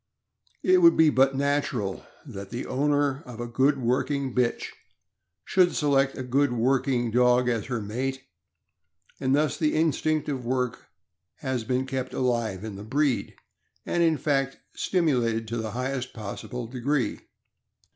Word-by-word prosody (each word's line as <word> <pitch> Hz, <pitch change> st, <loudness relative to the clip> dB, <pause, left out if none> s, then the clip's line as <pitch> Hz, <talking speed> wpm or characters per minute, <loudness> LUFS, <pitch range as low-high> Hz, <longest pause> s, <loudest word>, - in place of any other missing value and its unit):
It 370 Hz, 0 st, +5 dB
would 335 Hz, -1 st, +6 dB
be 160 Hz, -2 st, +6 dB
but 135 Hz, 0 st, +3 dB
natural 140 Hz, -8 st, -1 dB, 0.2 s
that 100 Hz, -8 st, -8 dB
the 120 Hz, -, -5 dB
owner 145 Hz, +1 st, +1 dB
of 120 Hz, -3 st, -9 dB
a 120 Hz, -, -3 dB
good 135 Hz, +4 st, +2 dB
working 130 Hz, +2 st, 0 dB
bitch 125 Hz, -2 st, 0 dB, 0.8 s
should 180 Hz, -2 st, +3 dB
select 135 Hz, -2 st, +2 dB
a 130 Hz, -, -4 dB
good 135 Hz, +2 st, +2 dB
working 125 Hz, 0 st, +1 dB
dog 125 Hz, +1 st, +4 dB
as 115 Hz, -4 st, 0 dB
her 125 Hz, -3 st, -2 dB
mate, 130 Hz, +6 st, -3 dB, 1.0 s
and 130 Hz, +1 st, +2 dB
thus 150 Hz, 0 st, +1 dB
the 155 Hz, -2 st, +1 dB
instinct 155 Hz, -1 st, +1 dB
of 135 Hz, -4 st, -3 dB
work 125 Hz, 0 st, -2 dB, 0.5 s
has 130 Hz, -3 st, -3 dB
been 125 Hz, +3 st, -1 dB
kept 130 Hz, -1 st, -4 dB
alive 115 Hz, -6 st, -1 dB
in 105 Hz, -3 st, -6 dB
the 100 Hz, -, -8 dB
breed, 135 Hz, +3 st, 0 dB, 0.5 s
and 175 Hz, -, 0 dB
in 165 Hz, -2 st, +3 dB
fact 135 Hz, -1 st, 0 dB, 0.2 s
stimulated 120 Hz, -, +1 dB
to 115 Hz, -, -2 dB
the 110 Hz, -1 st, -3 dB
highest 130 Hz, +1 st, -3 dB
possible 115 Hz, +3 st, -6 dB
degree. 130 Hz, +3 st, -1 dB
130 Hz, 145 wpm, -26 LUFS, 120-145 Hz, 1.0 s, would